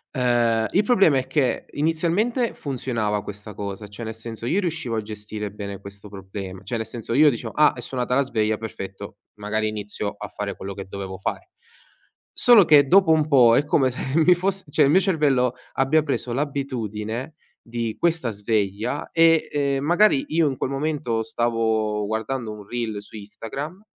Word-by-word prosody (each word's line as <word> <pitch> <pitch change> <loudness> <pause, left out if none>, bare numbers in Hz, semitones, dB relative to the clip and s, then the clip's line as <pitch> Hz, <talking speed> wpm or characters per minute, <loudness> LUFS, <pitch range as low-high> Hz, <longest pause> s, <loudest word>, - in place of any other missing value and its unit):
Ehm, 120 -3 +2
il 200 - +4
problema 195 - +4
è 130 - -1
che, 135 -4 0
inizialmente, 175 - 0
funzionava 115 -7 -2
questa 105 0 -9
cosa, 100 +1 -6
cioè, 105 +3 -9
nel 110 - -4
senso 115 0 -8
io 175 +11 +1
riuscivo 160 - -2
a 110 - 0
gestire 105 0 -6
bene 100 -1 -7
questo 100 +1 -11
proble 95 -1 -8
cioè 115 +5 -3
nel 110 - -3
senso 115 -1 -6
io 150 0 +6
dicevo: 115 -1 -6
"Ah, 150 0 +4
è 125 - -8
suonata 125 0 -3
la 135 - +4
sveglia, 110 -5 0
perfetto, 95 -3 -8 0.2
magari 110 +1 -1
inizio 105 -1 -4
a 105 0 -7
fare 100 0 -5
quello 95 0 -7
che 100 - -6
dovevo 95 -1 -6
fare"; 95 - -4 0.8
solo 240 -4 +6
che 145 -3 +6
dopo 190 0 +5
un 155 -1 +3
po' 125 -6 +6
è 145 - +2
come 135 -3 +3
se 130 +5 -1
mi 175 +2 +6
fosse 190 +2 -2
cioè 150 +1 +3
il 140 - +4
mio 185 - +6
cervello 145 - +2 0.2
abbia 140 +4 +2
preso 135 -4 -2
l'abitudine 130 -3 -3 0.3
di 115 -1 -4
questa 165 -8 +1
sveglia 105 +4 -2
e, 165 -1 +4
ehm, 140 -2 0
magari, 175 -1 +4
io 160 -1 +2
in 135 - -2
quel - - -2
momento 135 -5 -1
stavo 110 -2 0
guardando 110 +2 -3
un 105 -1 -10
reel 115 -4 -3
su 105 - -15
Instagram, 135 - -7
120 Hz, 180 wpm, -23 LUFS, 105-150 Hz, 0.8 s, io